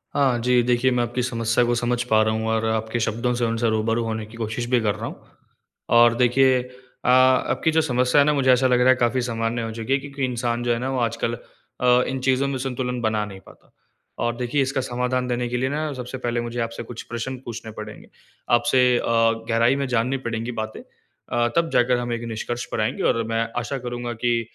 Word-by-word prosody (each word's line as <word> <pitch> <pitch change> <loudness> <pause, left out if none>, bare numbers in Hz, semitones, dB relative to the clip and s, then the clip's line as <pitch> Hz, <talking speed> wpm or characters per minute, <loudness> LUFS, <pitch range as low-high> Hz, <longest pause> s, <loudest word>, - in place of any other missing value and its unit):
हाँ, 130 -4 +2
जी 125 +1 +3
देखिए, 125 +1 +2
मैं 120 -1 +1
आपकी 120 +1 -2
समस्या 115 -1 +1
को 120 0 +1
समझ 120 +1 0
पा 110 -3 +3
रहा 110 0 +1
हूँ 110 0 -2
और 110 0 0
आपके 110 +1 -1
शब्दों 115 +2 -1
से 120 - +1
उनसे 115 0 0
रूबरू 115 +1 0
होने 110 -1 -3
की 115 +2 -13
कोशिश 115 +1 -3
भी 125 -1 +3
कर 105 -3 0
रहा - - -6
हूँ। - - -11 0.7
और 120 0 +6
देखिए 125 +1 +4 0.4
अ, - - +2
आपकी 130 +3 +4
जो 160 0 +3
समस्या 125 0 +3
है - - +4
ना 150 - +3
मुझे 130 -2 +3
ऐसा 130 +1 +4
लग 125 -1 +3
रहा 125 +1 +4
है 130 - +6
काफ़ी 125 +1 +1
सामान्य 115 0 -2
हो 115 0 -4
चुकी 115 +4 -2
है 135 - +2
क्योंकि 140 -1 -4
इंसान 120 -1 -2
जो 120 - +1
है 115 - -2
ना 130 +1 -2
वो 130 - -1
आजकल 115 0 -1
अ, 125 +1 0
इन 135 0 -3
चीज़ों 130 +1 +2
में 135 -1 -2
संतुलन 125 -1 -3
बना 110 -1 0
नहीं 95 -2 -10
पाता। - - -19 0.5
और 120 0 0
देखिए 125 +3 0
इसका 135 0 0
समाधान 125 0 -1
देने 120 0 -1
के 125 - -1
लिए 130 +2 0
ना 150 +1 -2
सबसे 125 0 -6
पहले 120 -1 -2
मुझे 120 0 -5
आपसे 115 +1 -4
कुछ 115 0 -8
प्रश्न 125 +3 -4
पूछने 115 -1 -7
पड़ेंगे? 110 0 -10 0.4
आपसे 125 +1 +4
अ, - - -2 0.5
गहराई 115 +3 +3
में 140 -1 -2
जाननी 125 +2 0
पड़ेंगी 115 +1 -3
बातें 110 0 -5
अ, 120 0 -4
तब 170 -1 +2
जाकर 125 0 +3
हम 120 -1 -2
एक 115 0 -4
निष्कर्ष 120 +2 -4
पर - - -1
आएँगे - - -1
और 115 - -1
मैं 115 0 0
आशा 135 +3 -3
करूँगा 120 0 -4
कि 120 -1 +2
120 Hz, 225 wpm, -23 LUFS, 115-130 Hz, 0.7 s, और